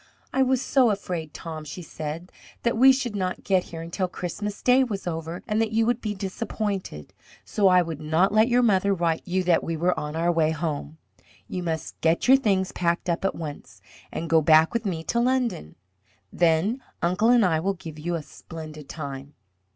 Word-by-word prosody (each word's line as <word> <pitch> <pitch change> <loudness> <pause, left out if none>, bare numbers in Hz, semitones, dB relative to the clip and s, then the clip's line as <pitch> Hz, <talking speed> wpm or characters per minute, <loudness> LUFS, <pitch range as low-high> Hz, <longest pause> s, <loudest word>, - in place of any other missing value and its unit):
"I 265 - +2
was 260 0 +2
so 260 -4 +4
afraid, 180 -6 -3
Tom," 160 -2 -7
she 175 +4 -8
said, 160 +3 -6 0.3
"that 235 0 +1
we 260 +4 +7
should 255 -5 -1
not 185 -2 -2
get 190 -2 +2
here 165 -1 -7
until 180 +3 -2
Christmas 200 +4 -5
Day 255 +1 +5
was 210 -6 -4
over 165 0 -4
and 215 0 +1
that 225 0 -1
you 225 0 +3
would 240 +1 0
be 210 -1 -3
disappointed. 195 - -4 0.3
So 200 -2 +2
I 180 -1 +5
would 160 -3 -6
not 160 +6 +2
let 215 +1 +5
your 245 0 +3
mother 200 -3 +3
write 165 -2 0
you 185 +1 0
that 175 -2 +3
we 165 -1 -3
were 175 +3 +2
on 150 +1 -5
our 170 +2 +2
way 160 -2 +2
home. 155 -1 -3 0.5
You 180 - -4
must 165 -3 -4
get 165 +6 +2
your 265 +1 +8
things 195 -7 +1
packed 170 +1 0
up 170 - -2
at 195 - 0
once, 150 -3 -8 0.3
and 165 - -4
go 165 0 +4
back 155 +3 +5
with 235 -2 -1
me 165 -4 -3
to 235 - 0
London. 240 - 0 0.6
Then 175 +9 +2 0.2
uncle 185 +6 +2
and 240 -4 +5
I 160 -3 +2
will 195 +4 -1
give 160 -3 -9
you 170 +3 -2
a 160 - -4
splendid 155 -2 -10
time." 140 -2 -7
180 Hz, 200 wpm, -25 LUFS, 160-215 Hz, 0.6 s, your